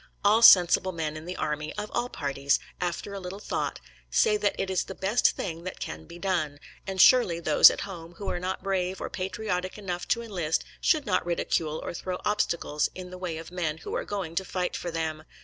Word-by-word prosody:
All 215 Hz, +3 st, +5 dB
sensible 185 Hz, -3 st, +7 dB
men 160 Hz, -3 st, -3 dB
in 155 Hz, +1 st, -8 dB
the 180 Hz, +1 st, -5 dB
army, 150 Hz, 0 st, -3 dB
of 210 Hz, 0 st, -4 dB
all 240 Hz, +1 st, -1 dB
parties, 140 Hz, -, 0 dB, 0.2 s
after 180 Hz, +3 st, -3 dB
a 200 Hz, -, -4 dB
little 185 Hz, +1 st, -6 dB
thought, 205 Hz, -, -3 dB, 0.3 s
say 445 Hz, -2 st, +3 dB
that 420 Hz, -, +1 dB
it 195 Hz, -, 0 dB
is 185 Hz, -, 0 dB
the 190 Hz, -, -8 dB
best 205 Hz, +6 st, +2 dB
thing 165 Hz, -2 st, -4 dB
that 185 Hz, -, -6 dB
can -, -, -6 dB
be 170 Hz, -, -11 dB
done, 170 Hz, -6 st, -1 dB, 0.3 s
and 190 Hz, -1 st, -4 dB
surely 185 Hz, -7 st, +6 dB
those 155 Hz, -3 st, +8 dB
at -, -, -4 dB
home 175 Hz, -4 st, -8 dB
who 200 Hz, -, -7 dB
are -, -, -1 dB
not 185 Hz, +1 st, -3 dB
brave 190 Hz, -1 st, -1 dB
or -, -, -5 dB
patriotic 185 Hz, 0 st, -3 dB
enough 180 Hz, -4 st, -4 dB
to 235 Hz, -, +1 dB
enlist 175 Hz, -8 st, -1 dB, 0.2 s
should 310 Hz, -4 st, +3 dB
not 205 Hz, -, +1 dB
ridicule 165 Hz, -2 st, -1 dB
or -, -, -4 dB
throw 180 Hz, +1 st, -4 dB
obstacles 170 Hz, -7 st, 0 dB
in 180 Hz, -1 st, -8 dB
the 185 Hz, -, -7 dB
way 175 Hz, -3 st, -3 dB
of 165 Hz, +1 st, -9 dB
men 165 Hz, -4 st, -2 dB
who 160 Hz, -, -7 dB
are -, -, -1 dB
going 195 Hz, -5 st, -4 dB
to 190 Hz, -, 0 dB
fight 180 Hz, -1 st, -2 dB
for 175 Hz, -, -4 dB
them. 160 Hz, -2 st, -3 dB
180 Hz, 220 wpm, -27 LUFS, 165-195 Hz, 0.3 s, those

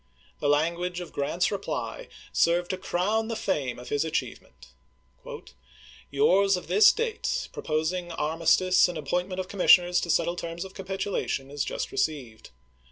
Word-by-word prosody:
The 145 Hz, -, 0 dB
language 170 Hz, +4 st, 0 dB
of 175 Hz, -, -8 dB
Grant's 165 Hz, +5 st, 0 dB
reply 355 Hz, -, -4 dB, 0.3 s
served 175 Hz, +2 st, +2 dB
to 185 Hz, -, -3 dB
crown 205 Hz, +5 st, 0 dB
the 230 Hz, -, -3 dB
fame 140 Hz, -, -2 dB
of 125 Hz, 0 st, -10 dB
his 145 Hz, +1 st, +1 dB
achievement: 160 Hz, -, -5 dB, 0.7 s
" 65 Hz, 0 st, -22 dB
Yours 185 Hz, +7 st, +3 dB
of 180 Hz, -, -8 dB
this 425 Hz, 0 st, +6 dB
date, 470 Hz, +2 st, -2 dB
proposing 170 Hz, +3 st, -2 dB
ar 155 Hz, 0 st, -2 dB
mistice 180 Hz, +3 st, +4 dB
and 175 Hz, -, -5 dB
appointment 180 Hz, +5 st, -2 dB
of 185 Hz, -, -3 dB
commissioners 180 Hz, -2 st, +4 dB
to 170 Hz, -, -5 dB
settle 170 Hz, +1 st, +1 dB
terms 170 Hz, +1 st, -5 dB
of 190 Hz, -, -11 dB
capitulation, 190 Hz, -8 st, -3 dB
is 145 Hz, -1 st, -2 dB
just -, -, -4 dB
received. 130 Hz, -8 st, -3 dB
175 Hz, 155 wpm, -27 LUFS, 150-190 Hz, 0.7 s, this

